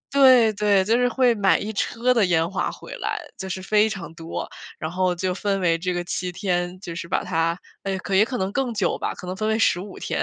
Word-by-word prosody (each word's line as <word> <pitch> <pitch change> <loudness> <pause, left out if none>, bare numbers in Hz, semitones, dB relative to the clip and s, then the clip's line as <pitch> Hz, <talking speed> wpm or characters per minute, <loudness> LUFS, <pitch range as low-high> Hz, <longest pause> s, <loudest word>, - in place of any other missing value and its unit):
对 255 -5 +6
对， 200 -2 +2
就 225 +3 +3
是 245 0 +3
会 245 -1 +3
买 200 -2 +3
一 215 +2 -4
车 245 +5 +1
的 225 -4 +4
烟 165 -1 +2
花 190 - -1
回 - - -10
来， - - -2 0.2
就 190 - -6
是 190 0 -4
非 210 +3 +3
常 170 -5 -7
多。 165 0 -5 0.3
然 160 0 -4
后 180 0 +1
就 180 +1 -2
分 195 0 -1
为 170 -2 +3
这 180 +1 -2
个 175 0 -2
7 180 0 -3
天， 180 -1 -2
就 170 -4 -7
是 170 0 -6
把 - - 0
它， 165 -1 0 0.2
哎， 195 -1 -2
可 190 +1 -4
也 205 +3 +6
可 250 +1 -4
能 190 -1 -1
更 265 -3 -1
久 205 -5 0
吧， - - -2
可 180 - -10
能 185 - -3
分 215 +1 -1
为 220 0 +1
15 190 -1 0
天， - - -2
190 Hz, 250 characters per minute, -23 LUFS, 180-220 Hz, 0.3 s, 对